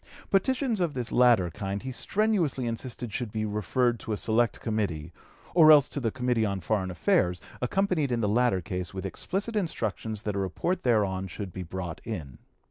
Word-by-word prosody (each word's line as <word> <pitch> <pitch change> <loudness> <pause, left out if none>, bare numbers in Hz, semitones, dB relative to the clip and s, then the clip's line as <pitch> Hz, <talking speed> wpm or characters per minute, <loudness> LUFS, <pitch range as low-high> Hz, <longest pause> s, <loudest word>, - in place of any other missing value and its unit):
Petitions 245 +3 +2
of 170 -5 0
this 125 -3 -3
latter 120 -8 +4
kind 100 +3 -4
he 130 - -4
strenuously 180 - 0
insisted 115 -1 -4
should 120 -2 -3
be 110 0 -2
referred 110 +4 0
to - - -6
a - - -1
select 115 +2 +1
committee, 90 -8 -2 0.4
or 160 -3 +8
else 145 -3 +7
to - - -3
the 120 -4 0
Committee 125 -1 0
on 100 -2 -1
Foreign 95 0 -1
Affairs, 90 +1 +1 0.2
accompanied 160 0 +1
in 120 - +1
the 105 - +1
latter 110 -3 +2
case 90 +1 -5
with 95 - -4
explicit 195 - -3
instructions 110 - -2
that 105 -2 -2
a - - 0
report 100 - -1
thereon 100 -6 +1
should 95 -1 -7
be 95 - -5
brought 90 -1 -5
in. 80 - -6
110 Hz, 185 wpm, -28 LUFS, 95-130 Hz, 0.4 s, or